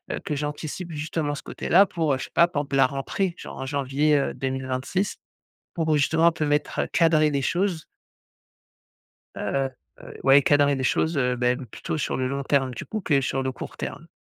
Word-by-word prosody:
heu, - - -5
que 150 - -2
j'anticipe 150 +4 -4
justement 150 -1 -2
ce - - -8
côté-là 190 +4 +3
pour, 165 -6 0
heu, 130 - 0
je - - -5
sais - - -16
pas, 170 - +5
par 150 -4 -2
exemple 140 -1 -4
la 135 - +6
rentrée 155 +7 -2
genre - - -9
en 135 - -4
janvier, 140 +2 +1
heu, 140 - 0
2026 130 +7 -2 0.6
pour 160 -2 +1
justement 160 +3 +2
un - - +6
peu 155 - -2
mettre, 145 0 0
heu - - -2
cadrer 155 -2 +4
les 140 -1 -1
choses». 175 -1 0 1.5
Heu - - -3 0.5
heu, - - -11
ouais 135 +1 +7
cadrer 145 0 +3
des 130 - -3
choses, 160 +4 +1
heu, 125 -1 +1
ben 125 +1 0
plutôt 135 - -5
sur - - -1
le 130 -1 -1
long 140 +1 -2
terme 135 -2 +1
du - - -6
coup 215 - -4
que 145 -7 +2
sur 135 0 -1
le 130 0 -2
court - - -8
terme. 165 +3 -6
145 Hz, 205 wpm, -25 LUFS, 135-160 Hz, 1.5 s, ouais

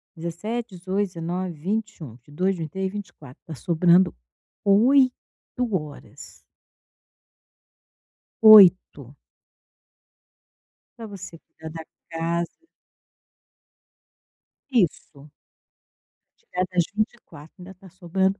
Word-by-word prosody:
17, 190 +6 -5
18, 185 +2 -5
19, 175 +1 -5
20, 200 +8 -4
21, 150 -8 -9
22, 150 +10 -3
23, 185 +4 -4
24, 170 -10 -11
tá 160 - -8
sobrando 175 +6 +3 0.5
8 255 +7 +4 0.6
horas. 150 -7 -7 2.0
8. 185 - +6 1.8
Pra 230 - -8
você 195 -5 -10
cuidar 160 0 -13
da 160 0 -9 0.2
casa. 170 - -4 2.0
Isso. 160 - -1 1.1
Tirar 180 +1 -3
das 180 -1 +2
24, 210 -8 -5
ainda 185 +1 -12
tá 190 +1 -17
sobrando 190 +2 -1
180 Hz, 80 wpm, -23 LUFS, 165-195 Hz, 2.0 s, 8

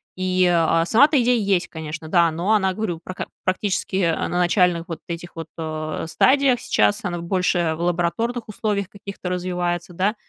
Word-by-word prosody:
И, 185 0 +1
э, 165 -1 +3
сама-то 285 - +5
идея 245 0 +3
есть, 195 -3 +1
конечно, 160 0 -7
да, 170 0 +4
но 175 +7 0
она, 190 -3 +2
говорю, 185 -6 -3
прак 185 - -6 0.2
практически, 190 +1 -1
э, 170 -4 +2
на 175 - -2
начальных 175 -1 +2
вот 165 - -6
этих 170 0 -7
вот, 165 -1 -6
э, 155 -1 -4
стадиях 260 - +3
сейчас, 105 - +1
она 175 -1 -2
больше 175 -2 +1
в 165 - -7
лабораторных 180 +8 -1
условиях 205 -2 -2
каких-то 200 -2 -7
развивается, 180 -1 -2
да, 195 +5 0
180 Hz, 170 wpm, -22 LUFS, 170-200 Hz, 0.2 s, сама-то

